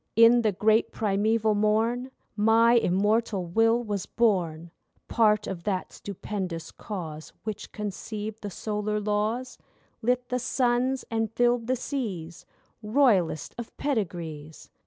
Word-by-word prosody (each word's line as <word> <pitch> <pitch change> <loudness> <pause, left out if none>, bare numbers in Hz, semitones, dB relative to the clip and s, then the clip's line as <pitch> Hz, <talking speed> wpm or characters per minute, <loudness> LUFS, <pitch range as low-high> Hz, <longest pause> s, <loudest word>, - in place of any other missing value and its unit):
In 230 +1 +7
the 220 -2 +2
great 215 +3 +2
primeval 215 +1 +1
morn 220 +4 +1 0.3
My 225 +2 +5
immortal 210 -1 +2
will 225 +7 +2
was 205 -4 -3
born, 175 -8 0 0.4
Part 215 -2 +3
of 175 -3 -5
that 190 -3 -2
stupendous 185 -4 -5
Cause 160 -7 -7
Which 215 -2 -6
conceived 210 +1 -5
the 205 - -4
Solar 210 +2 -2
Laws, 215 +5 -1 0.4
Lit 245 +1 0
the 250 - 0
suns 250 +1 +1
and 225 -1 0
filled 240 0 +2
the 255 - +2
seas, 200 - -5 0.3
Royalest 210 - +2
of 235 - -8
pedigrees. 170 - -4
215 Hz, 120 wpm, -27 LUFS, 195-235 Hz, 0.4 s, In